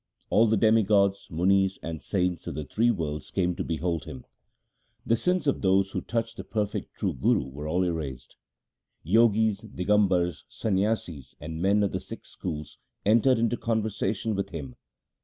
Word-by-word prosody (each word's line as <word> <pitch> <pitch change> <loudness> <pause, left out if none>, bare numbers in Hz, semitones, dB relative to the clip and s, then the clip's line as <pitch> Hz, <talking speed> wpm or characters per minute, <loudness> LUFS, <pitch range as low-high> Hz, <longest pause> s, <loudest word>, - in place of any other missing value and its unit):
All 115 +2 +5
the 110 0 +3
demigods, 100 -3 +3
munis, 95 +3 +2
and 80 -1 -5
saints 90 -4 -1
of - - -4
the 75 - -3
three 115 - +1
worlds 80 -8 -2
came 90 -2 0
to - - -3
behold 85 -1 -2
him. 65 -1 -9 0.8
The 115 - +3
sins 180 +6 0
of 140 - +1
those 95 0 +3
who - - -2
touched 115 -1 -3
the - - -5
perfect 105 -2 -3
true - - -1
Guru 65 - +1
were 75 +3 -7
all 90 +4 +1
erased. 75 -7 -4 0.7
Jogis, 110 +1 +3
Digambars, 95 -5 +1
Sanyasis, 95 - -2
and 80 +2 -6
men 100 +2 +3
of 100 - 0
the - - -2
six - - -10
schools 75 -4 -6 0.3
entered 115 +4 +4
into 115 +1 +1
conversation 110 -1 -1
with 100 -1 -2
him. 70 -7 -7
95 Hz, 160 wpm, -27 LUFS, 80-110 Hz, 0.8 s, All